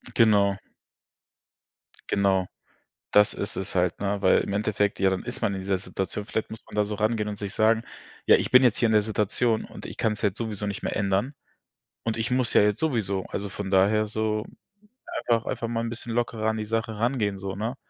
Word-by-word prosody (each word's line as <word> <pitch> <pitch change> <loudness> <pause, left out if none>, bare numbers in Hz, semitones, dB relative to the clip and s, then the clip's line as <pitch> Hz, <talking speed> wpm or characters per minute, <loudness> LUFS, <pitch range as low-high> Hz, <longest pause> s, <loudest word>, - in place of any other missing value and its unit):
Genau. 100 -3 +4 1.5
Genau. 95 -2 +2 0.6
Das 105 0 +5
ist 100 - -4
es 95 - -4
halt, 90 -2 +1
ne, 100 0 -1
weil - - +5
im - - -4
Endeffekt 105 0 0
ja 95 0 +4
dann 95 -1 -2
ist - - -6
man 100 - +1
in 95 - -4
dieser 95 0 0
Situation, 95 +2 -4
vielleicht 110 0 -3
muss 110 - -9
man - - -12
da 105 - +3
so 105 +1 -4
rangehen 110 0 0
und 105 - -5
sich 100 -1 -5
sagen: 110 +1 +3 0.4
„Ja, - - +7
ich - - -1
bin 125 - +8
jetzt 120 -4 +4
hier 120 - +3
in - - +1
der 105 -1 +5
Situation 110 +2 0
und - - -11
ich - - -7
kann's 105 -2 0
halt 100 -3 +1
sowieso 105 -3 -3
nicht 100 -1 -5
mehr - - -2
ändern 100 +7 0 0.7
und 115 -1 -1
ich 115 +2 -2
muss 125 -2 +1
ja - - +6
jetzt 105 -1 +1
sowieso“, 105 -11 0
also, 100 0 -4
von 100 0 -5
daher 100 +3 +3
so 110 0 -1 0.7
einfach 115 -1 +1
einfach 115 - -2
mal 115 0 -2
'n 115 - -2
bisschen 120 0 -6
lockerer 115 -2 0
an 110 - -1
die 110 - -3
Sache 110 0 -2
rangehen 110 -5 0
so, 95 0 -4
ne? 110 +6 -3
105 Hz, 215 wpm, -26 LUFS, 100-115 Hz, 1.5 s, bin